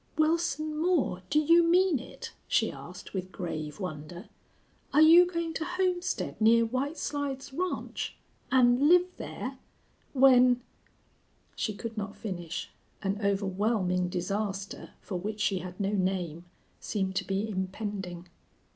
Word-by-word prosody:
"Wilson 310 Hz, -1 st, +1 dB
Moore, 320 Hz, -, +1 dB
do 300 Hz, -, +2 dB
you 335 Hz, +3 st, +6 dB
mean 345 Hz, -2 st, +4 dB
it?" 255 Hz, -, -9 dB
she -, -, +2 dB
asked, -, -, -10 dB
with 185 Hz, -1 st, -4 dB
grave 155 Hz, -4 st, -5 dB
wonder. 175 Hz, +1 st, -6 dB, 0.6 s
"Are 300 Hz, -, +6 dB
you 340 Hz, +3 st, +8 dB
going 335 Hz, -2 st, -3 dB
to 320 Hz, -, -2 dB
homestead 360 Hz, -5 st, -1 dB
near 230 Hz, +1 st, +6 dB
White 265 Hz, +7 st, -2 dB
Slides 280 Hz, -2 st, -3 dB
Ranch 365 Hz, +5 st, -3 dB, 0.4 s
and 255 Hz, +2 st, +5 dB
live 360 Hz, +1 st, +6 dB
there -, -, -6 dB, 0.5 s
when 255 Hz, -2 st, +6 dB, 0.5 s
" -, -, -38 dB
She 215 Hz, -, -2 dB
could 225 Hz, +2 st, -6 dB
not 200 Hz, 0 st, -5 dB
finish. 175 Hz, -6 st, -5 dB, 0.3 s
An 195 Hz, +1 st, -1 dB
overwhelming 195 Hz, -2 st, +1 dB
disaster, 195 Hz, +2 st, -3 dB
for 185 Hz, -, -4 dB
which 210 Hz, +3 st, -4 dB
she 200 Hz, -2 st, +1 dB
had 180 Hz, 0 st, -8 dB
no 200 Hz, 0 st, 0 dB
name, 180 Hz, -4 st, -1 dB, 0.3 s
seemed 190 Hz, -3 st, -2 dB
to -, -, +1 dB
be 195 Hz, +2 st, -1 dB
impending. 190 Hz, -2 st, -4 dB
215 Hz, 135 wpm, -29 LUFS, 190-305 Hz, 0.6 s, you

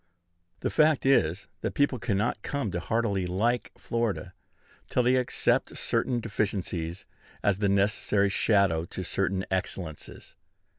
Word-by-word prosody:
The -, -, -1 dB
fact 155 Hz, -3 st, +3 dB
is, 100 Hz, -10 st, +3 dB
that -, -, -3 dB
people 140 Hz, -3 st, +2 dB
cannot 100 Hz, 0 st, 0 dB
come 140 Hz, -6 st, -2 dB
to 85 Hz, -, -2 dB
heartily 100 Hz, -1 st, 0 dB
like 115 Hz, +7 st, 0 dB
Florida 115 Hz, -9 st, -2 dB, 0.6 s
till 125 Hz, -, +2 dB
they 125 Hz, +2 st, +4 dB
accept 125 Hz, -, +1 dB
certain 125 Hz, -2 st, 0 dB
deficiencies 95 Hz, -6 st, -2 dB, 0.4 s
as 100 Hz, -1 st, +2 dB
the 100 Hz, -1 st, +2 dB
necessary 100 Hz, 0 st, +2 dB
shadow 95 Hz, -5 st, +2 dB
to 95 Hz, -, -6 dB
certain 95 Hz, +1 st, -1 dB
excellences. 90 Hz, -4 st, -4 dB
100 Hz, 130 wpm, -28 LUFS, 95-115 Hz, 0.6 s, they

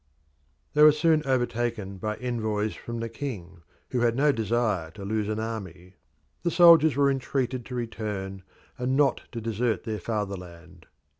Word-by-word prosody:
They 150 Hz, -, +3 dB
were 150 Hz, 0 st, +10 dB
soon 155 Hz, +1 st, +3 dB
overtaken 120 Hz, -6 st, -1 dB
by 105 Hz, +2 st, -2 dB
envoys 110 Hz, -4 st, -2 dB
from 115 Hz, 0 st, -7 dB
the 115 Hz, -, -2 dB
king, 105 Hz, -9 st, -7 dB, 0.3 s
who 125 Hz, -, 0 dB
had 120 Hz, -1 st, +2 dB
no 145 Hz, +3 st, +4 dB
desire 110 Hz, -, 0 dB
to 100 Hz, +5 st, -10 dB
lose 105 Hz, 0 st, -1 dB
an 110 Hz, 0 st, -2 dB
army. 95 Hz, -5 st, -6 dB, 0.4 s
The 170 Hz, -, 0 dB
soldiers 165 Hz, -4 st, +7 dB
were 140 Hz, 0 st, +3 dB
entreated 130 Hz, -2 st, -2 dB
to 125 Hz, -, -6 dB
return 105 Hz, -5 st, -4 dB, 0.4 s
and 130 Hz, +2 st, 0 dB
not 145 Hz, -2 st, +3 dB
to 120 Hz, -, -5 dB
desert 115 Hz, +1 st, -1 dB
their 110 Hz, -2 st, -3 dB
fatherland. 90 Hz, -5 st, -6 dB
115 Hz, 155 wpm, -26 LUFS, 100-130 Hz, 0.4 s, were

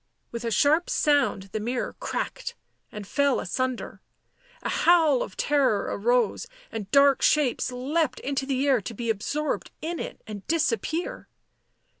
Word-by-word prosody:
With 235 Hz, 0 st, -5 dB
a 230 Hz, -, -1 dB
sharp 305 Hz, +9 st, +3 dB
sound 290 Hz, -9 st, +2 dB
the 215 Hz, -, -2 dB
mirror 240 Hz, +3 st, -2 dB
cracked 485 Hz, -1 st, -4 dB, 0.4 s
and 210 Hz, -1 st, -7 dB
fell 280 Hz, +5 st, +1 dB
asunder; 255 Hz, +6 st, -3 dB, 0.6 s
a -, -, -2 dB
howl 325 Hz, -6 st, +4 dB
of 190 Hz, -, -5 dB
terror 280 Hz, -8 st, +1 dB
arose, 240 Hz, -, +1 dB, 0.2 s
and 210 Hz, -3 st, -5 dB
dark 280 Hz, -1 st, +5 dB
shapes 280 Hz, -4 st, +2 dB
leapt 275 Hz, +4 st, -1 dB
into 270 Hz, -1 st, -2 dB
the 270 Hz, 0 st, 0 dB
air 260 Hz, -5 st, +4 dB
to 230 Hz, -, -7 dB
be 230 Hz, +1 st, -1 dB
absorbed 290 Hz, +8 st, -2 dB
in 335 Hz, +2 st, -4 dB
it -, -, -6 dB
and 210 Hz, -3 st, -8 dB
disappear. 320 Hz, -, -1 dB
270 Hz, 145 wpm, -26 LUFS, 230-300 Hz, 0.6 s, dark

